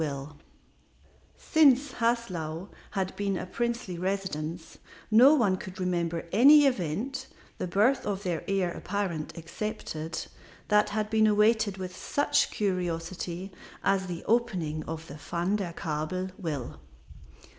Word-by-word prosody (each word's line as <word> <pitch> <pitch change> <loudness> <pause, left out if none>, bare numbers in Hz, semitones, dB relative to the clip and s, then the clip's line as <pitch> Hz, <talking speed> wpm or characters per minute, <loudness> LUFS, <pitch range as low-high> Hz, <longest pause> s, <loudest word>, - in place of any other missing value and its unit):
KING 145 -1 -4 1.0
Since 285 -3 +4
Haslau 190 -8 -1 0.2
had 190 -2 -2
been 200 -2 -1
a - - -4
princely 235 -3 -3
residence 180 -4 -3 0.3
no 255 +7 +8
one 205 -9 +2
could 185 +1 -9
remember 170 -2 -1
any 290 +6 +8
event 255 - -1 0.3
the - - -2
birth 230 +9 +3
of 200 -1 -2
the 175 -5 -1
heir 190 -3 +1
apparent 180 -5 -3
excepted 165 -2 -5 0.4
that 210 0 +4
had 215 0 -2
been 220 -1 +4
awaited 210 -1 +3
with 185 -1 -6
such 285 - +1
curiosity 180 -1 -3 0.3
as 190 -1 +2
the 175 -2 -5
opening 180 -10 0
of 160 0 -5
the 145 -1 -9
Van 170 +6 -1
der 190 -4 -3
Kabel 165 +3 -3
will. 150 -10 -5
190 Hz, 125 wpm, -28 LUFS, 165-215 Hz, 1.0 s, no